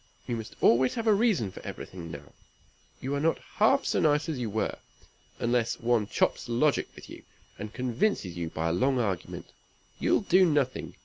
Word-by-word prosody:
You 120 Hz, -, -2 dB
must 110 Hz, -1 st, -7 dB
always 125 Hz, +2 st, +4 dB
have 230 Hz, -2 st, -3 dB
a 220 Hz, -, +5 dB
reason 205 Hz, -, +2 dB
for -, -, -10 dB
everything 85 Hz, -3 st, -8 dB
now. 70 Hz, -2 st, -10 dB, 0.7 s
You 135 Hz, +2 st, -3 dB
are 140 Hz, -, 0 dB
not 160 Hz, +3 st, +2 dB
half 230 Hz, +6 st, +2 dB
so -, -, +1 dB
nice 150 Hz, -1 st, +2 dB
as 150 Hz, -5 st, -3 dB
you 120 Hz, -3 st, -2 dB
were. 110 Hz, +1 st, -2 dB, 0.6 s
Unless 120 Hz, -1 st, 0 dB
one 115 Hz, -3 st, +1 dB
chops -, -, 0 dB
logic 130 Hz, +5 st, +2 dB
with -, -, -12 dB
you, -, -, -11 dB, 0.4 s
and 105 Hz, 0 st, -6 dB
convinces 125 Hz, -, -1 dB
you 85 Hz, -2 st, -3 dB
by 80 Hz, +1 st, -2 dB
a -, -, 0 dB
long 130 Hz, +8 st, +2 dB
argument, 100 Hz, -8 st, -3 dB, 0.5 s
you'll -, -, +2 dB
do 190 Hz, -1 st, +4 dB
nothing. 145 Hz, -7 st, 0 dB
125 Hz, 185 wpm, -28 LUFS, 105-155 Hz, 0.7 s, a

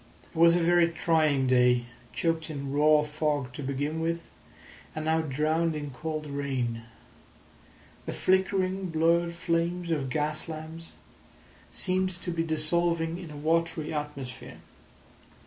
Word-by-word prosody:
It -, -, -24 dB
was 170 Hz, +1 st, +6 dB
a -, -, +3 dB
very 170 Hz, 0 st, +4 dB
trying 155 Hz, -5 st, +2 dB
day, 125 Hz, -1 st, +4 dB, 0.3 s
choked 165 Hz, -1 st, -1 dB
in 140 Hz, -3 st, -5 dB
raw 150 Hz, +1 st, +5 dB
fog 150 Hz, -4 st, -1 dB
to 145 Hz, -, -6 dB
begin 145 Hz, +3 st, -2 dB
with, 165 Hz, +1 st, -1 dB, 0.7 s
and 155 Hz, 0 st, -3 dB
now 160 Hz, +1 st, +2 dB
drowned 155 Hz, +3 st, 0 dB
in 145 Hz, -2 st, -5 dB
cold 155 Hz, +3 st, -4 dB
rain. 130 Hz, -5 st, -3 dB, 1.2 s
The -, -, -1 dB
flickering, 190 Hz, 0 st, +1 dB
blurred 170 Hz, +1 st, +2 dB
flames 170 Hz, +1 st, -1 dB
of 140 Hz, -5 st, -1 dB
gas 150 Hz, +4 st, -1 dB
lamps 160 Hz, +1 st, -8 dB, 0.8 s
seemed 185 Hz, 0 st, 0 dB
to 175 Hz, -, -4 dB
be 165 Hz, -1 st, -1 dB
dissolving 165 Hz, +1 st, +1 dB
in 175 Hz, -3 st, -8 dB
a 150 Hz, -, -9 dB
watery 165 Hz, +1 st, 0 dB
atmosphere. 145 Hz, -4 st, -6 dB
160 Hz, 130 wpm, -28 LUFS, 145-170 Hz, 1.2 s, was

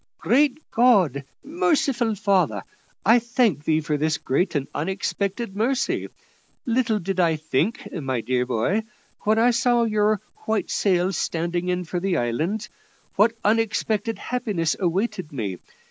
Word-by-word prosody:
"Great 280 Hz, +2 st, +2 dB
God! 190 Hz, -, +3 dB, 0.2 s
Merciful 275 Hz, -, +1 dB
Father! 180 Hz, -, +1 dB, 0.4 s
I 225 Hz, +3 st, +6 dB
thank 235 Hz, -, 0 dB
Thee 160 Hz, 0 st, +2 dB
for 150 Hz, -1 st, -1 dB
this 155 Hz, +1 st, 0 dB
great 170 Hz, +7 st, -1 dB
and 140 Hz, -2 st, -1 dB
unexpected 195 Hz, +5 st, -2 dB
mercy. 260 Hz, +5 st, 0 dB, 0.6 s
Little 235 Hz, -2 st, +1 dB
did 190 Hz, -1 st, -3 dB
I 165 Hz, -3 st, +3 dB
think, 155 Hz, -, -1 dB
my 135 Hz, -8 st, -2 dB
dear 125 Hz, +2 st, 0 dB
boy, 125 Hz, -, +1 dB, 0.4 s
when 215 Hz, +1 st, +3 dB
I 235 Hz, +2 st, +5 dB
saw 240 Hz, 0 st, +2 dB
your 215 Hz, -1 st, +2 dB, 0.3 s
white 220 Hz, -1 st, 0 dB
sails 185 Hz, -2 st, +1 dB
standing 170 Hz, +2 st, -2 dB
in 180 Hz, 0 st, 0 dB
for 175 Hz, +1 st, -3 dB
the 185 Hz, -1 st, 0 dB
island, 155 Hz, -, -1 dB, 0.5 s
what 220 Hz, +3 st, +4 dB
unexpected 220 Hz, 0 st, 0 dB
happiness 205 Hz, -10 st, -1 dB
awaited 185 Hz, -1 st, -1 dB
me. 105 Hz, -10 st, -4 dB
195 Hz, 135 wpm, -23 LUFS, 160-225 Hz, 0.6 s, I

